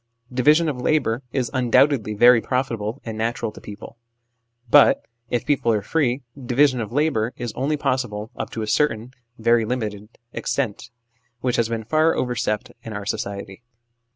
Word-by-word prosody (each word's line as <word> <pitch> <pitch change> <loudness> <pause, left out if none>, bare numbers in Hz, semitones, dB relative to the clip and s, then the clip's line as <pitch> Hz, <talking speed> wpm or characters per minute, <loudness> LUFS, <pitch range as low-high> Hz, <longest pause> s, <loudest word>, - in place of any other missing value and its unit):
Division 150 +6 +4
of 135 -5 -3
labour 125 -4 +1
is 130 -3 -1
undoubtedly 125 -3 +3
very 120 +2 +6
profitable 120 -2 -2
and 110 -2 -5
natural 115 0 -2
to - - -13
people; 105 +2 -10 0.7
but, - - +5 0.2
if 120 - -1
people 135 -5 +2
are 105 -2 0
free, 130 0 0 0.2
division 130 +1 +3
of 110 - -5
labour 130 -5 +1
is 120 -2 -4
only 145 +4 -1
possible 120 -6 -2
up - - -4
to 110 - -4
a - - -4
certain, 120 -2 0 0.3
very 115 0 +3
limited, 105 -3 -4 0.2
extent, 115 -4 -2 0.5
which 125 -1 0
has 115 -1 +1
been 115 -1 -3
far 155 +7 +2
overstepped 120 -4 -2
in 115 -1 -8
our 100 0 -5
society. 100 0 -4
120 Hz, 155 wpm, -22 LUFS, 110-130 Hz, 0.7 s, very